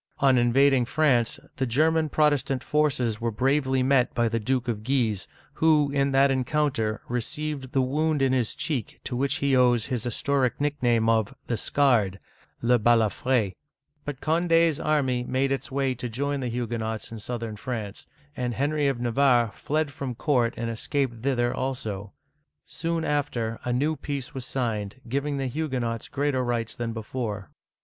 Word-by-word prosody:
On 135 -2 +4
invading 130 +2 +4
France, 125 -4 +2 0.2
the 130 - 0
German 155 +5 +2
Protestant 145 -4 +1
forces 130 -7 0
were 115 - 0
bravely 130 +3 +1
met 130 -2 +2
by 120 0 +2
the 115 0 -1
Duke 125 +2 -1
of 110 -3 -2
Guise, 115 -6 0 0.3
who, 155 -3 +3
in 140 0 +1
that 135 +1 +4
encounter, 130 -4 0
received 135 +2 -3
the 135 - +2
wound 150 +3 0
in 135 -1 +2
his 125 -4 0
cheek 135 -8 -3
to 125 - -4
which 135 +2 +1
he 140 -1 +1
owes 125 -3 +4
his 125 -5 -3
historic 130 +2 0
nick 145 -1 -1
name 115 -2 +3
of 115 +3 +1
" - - -45
the 120 - -1
Scarred 110 -7 +2 0.2
" - - -34
{le 120 +1 +4
Balafr^), 115 -1 +2 0.5
But 145 -2 -6
Condi's 165 -1 +3
army 135 -5 +1
made 130 +2 0
its 135 - -2
way 135 -1 0
to 125 0 -5
join 140 +5 -2
the 130 - -2
Huguenots 115 -1 -3
in 115 - -7
southern 115 -1 -5
France; 110 -3 -6 0.3
and 125 -2 -2
Henry 145 +1 +1
of 135 -3 0
Navarre 120 -1 +3
fled 150 +5 -2
from 135 -4 -5
court 120 -3 +1
and 115 - -2
escaped 120 0 -2
thither 120 -2 +1
also. 110 -7 -4 0.5
Soon 165 +1 -2
after, 125 -6 -1
a 125 - -2
new 145 +6 +1
peace 140 -1 -5
was 130 -3 -5
signed, 115 -4 -3
giving 140 +3 -1
the 135 - -2
Huguenots 125 -5 -2
greater 140 -2 0
rights 120 -2 -1
than 120 -1 -3
before. 110 -2 -5
130 Hz, 170 wpm, -26 LUFS, 115-140 Hz, 0.5 s, On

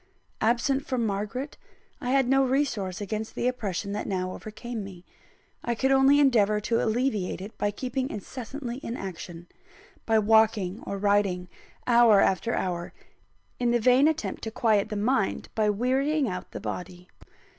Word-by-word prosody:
Absent 245 +4 +2
from 245 -3 0
Margaret, 210 +7 -3 0.4
I 245 - -3
had 270 -1 +3
no 270 +1 +4
resource 250 -9 -1
against 215 +2 -4
the 245 - 0
oppression 205 -5 -2
that 210 - -3
now 185 -1 -2
overcame 220 +1 -6
me. 185 -2 -11 0.6
I 235 - -1
could 265 +4 +1
only 270 +1 +5
endeavour 215 -7 +4
to 230 +2 0
alleviate 220 -6 0
it 200 +4 -8
by 205 - +1
keeping 255 +5 -3
incessantly 245 +4 -6
in 245 -2 -5
action; 175 -2 -7 0.6
by 225 -1 +4
walking 215 -2 +3
or 200 - -3
riding, 195 -3 +1 0.4
hour 235 -4 +6
after 210 +5 +2
hour, 175 -2 -3 0.7
in 245 -1 +1
the 240 0 +3
vain 255 +5 +5
attempt 320 0 -2
to - - -2
quiet 220 -2 +1
the 210 - -4
mind 215 0 0
by 215 -1 +2
wearying 265 +7 +1
out 180 -3 -5
the - - -7
body. 180 0 -6
220 Hz, 155 wpm, -27 LUFS, 200-255 Hz, 0.7 s, hour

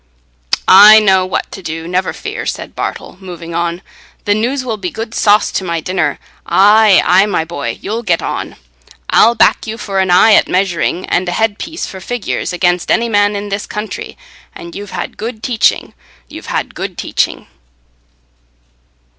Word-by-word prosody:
"I 210 +3 +9
know 190 -3 +2
what 185 - -3
to 195 - -9
do, 165 -1 -6
never 185 +1 -1
fear," - - -6
said - - -5
Bartle, - - -6
moving 175 -3 -9
on. 170 +1 -2 0.4
"The 205 - +2
news 255 +5 -1
will 225 -3 -3
be 185 -3 -4
good 225 +3 -7
sauce 210 -1 +3
to - - -2
my 170 -2 -2
dinner. 160 -4 -2 0.3
Aye, 210 0 +5
aye, 190 +3 +4
my 180 -5 -1
boy, 145 -8 -5
you'll 220 +4 -3
get 180 -7 0
on. - - -5 0.6
I'll 235 +2 +5
back - - +2
you 220 +1 -5
for 200 -3 -3
an 190 -1 +1
eye 180 +5 +6
at - - +4
measuring 185 -1 -1
and 180 0 -1
a - - -2
head 220 +2 0
piece 325 +1 -5
for 190 - -9
figures, 245 -2 -3
against 175 -1 0
any 235 0 +1
man 205 -1 +2
in 205 0 -5
this 200 +1 -4
county 210 0 -6 0.4
and 170 0 -10
you've 205 0 -7
had - - -6
good 225 0 -6
teaching—you've 70 - -3
had - - -3
good - - -6
teaching." - - -2
195 Hz, 170 wpm, -14 LUFS, 175-215 Hz, 0.6 s, I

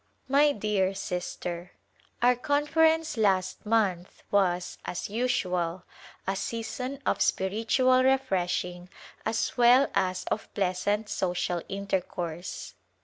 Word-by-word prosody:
My 285 +2 +5
dear 200 -5 0
Sister: 180 -1 -4 0.5
Our 250 +1 +6
Conference 310 +3 +2
last 195 -2 +1
month 195 -5 0
was, 180 -3 +1
as 180 - -5
usual, 185 -7 -1 0.4
a 195 - -1
season 230 +6 -4
of - - +1
spiritual 230 +6 +2
refreshing 180 -9 0 0.4
as 225 - -1
well 245 +3 +6
as 185 -1 0
of 215 - -2
pleasant 205 +2 0
social 180 -2 -1
intercourse. 180 -3 -4
200 Hz, 100 wpm, -28 LUFS, 180-250 Hz, 0.5 s, Our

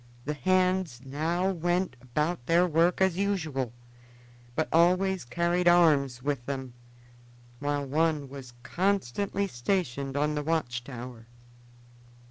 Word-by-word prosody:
The 150 - -1
hands 185 -2 +1
now 165 +7 0
went 175 -2 -1
about 140 +2 -2
their 170 +2 +4
work 170 +2 +2
as 190 -2 +3
usual, 160 - -1 0.8
but 160 - 0
always 185 +3 +3
carried 170 +7 0
arms 145 -8 +4
with 140 -3 -1
them, 130 -3 -4 0.9
while 145 0 -1
one 150 0 +1
was 130 -2 -10
constantly 200 +1 0
stationed 140 -2 -2
on 150 +1 +1
the 150 - -1
watch 145 -6 -1
tower. 120 -2 -9
155 Hz, 115 wpm, -28 LUFS, 135-180 Hz, 0.9 s, their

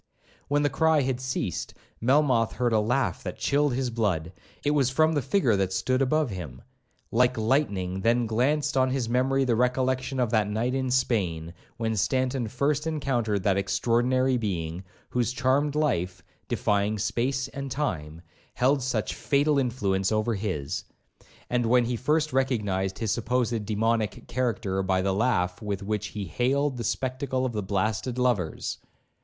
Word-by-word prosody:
When 145 +1 +2
the 145 - +3
cry 160 -2 +3
had 130 -1 -1
ceased, 130 -9 -3 0.3
Melmoth 125 -2 +3
heard 120 -2 0
a 110 - +4
laugh 125 +5 0
that - - -6
chilled 145 -2 +1
his 130 -1 -1
blood. 95 -7 -1 0.3
It 145 - +3
was 140 -4 +3
from 155 +4 +3
the 145 - +1
figure 130 - +2
that 95 -1 0
stood 130 +8 0
above 145 0 +1
him. 80 -9 -7 0.5
Like 125 +2 +3
lightning 100 -7 0
then 120 +3 +2
glanced 140 +7 +1
on 130 -1 +3
his 130 -2 -1
memory 130 +3 +2
the 120 -2 +2
recollection 130 +2 0
of 120 -3 +1
that 110 -3 +2
night 115 +4 -1
in 130 -1 -1
Spain, 95 -11 0 0.2
when 110 -1 -1
Stanton 125 +4 0
first 140 +6 0
encountered 120 -10 -1
that 100 -1 +2
extraordinary 125 +6 +2
being, 90 -5 -3 0.3
whose 120 -1 +1
charmed 135 +3 +1
life, 90 - 0 0.2
'defying 105 +1 +1
space 130 +6 -1
and 140 0 -6
time,' 85 - -3 0.3
held 135 +2 +2
such 125 -4 -1
fatal 145 +1 +2
influence 100 -7 0
over 110 +2 +1
his, 95 -9 -3 0.6
and 120 -1 0
when 125 +1 +4
he 120 +1 -1
first 150 +5 0
recognised 105 -8 0
his 110 -3 -1
supposed 120 -1 0
demoniac 110 -1 0
character 115 -6 -1
by 95 0 +1
the 95 0 +1
laugh 95 -5 0
with 100 -2 -3
which 105 0 -2
he 105 -2 -5
hailed 130 - 0
the 120 - -3
spectacle 130 +3 -1
of 125 - -2
the 105 - -1
blasted 105 +5 -1
lovers. 120 -10 -1
120 Hz, 160 wpm, -27 LUFS, 105-130 Hz, 0.6 s, a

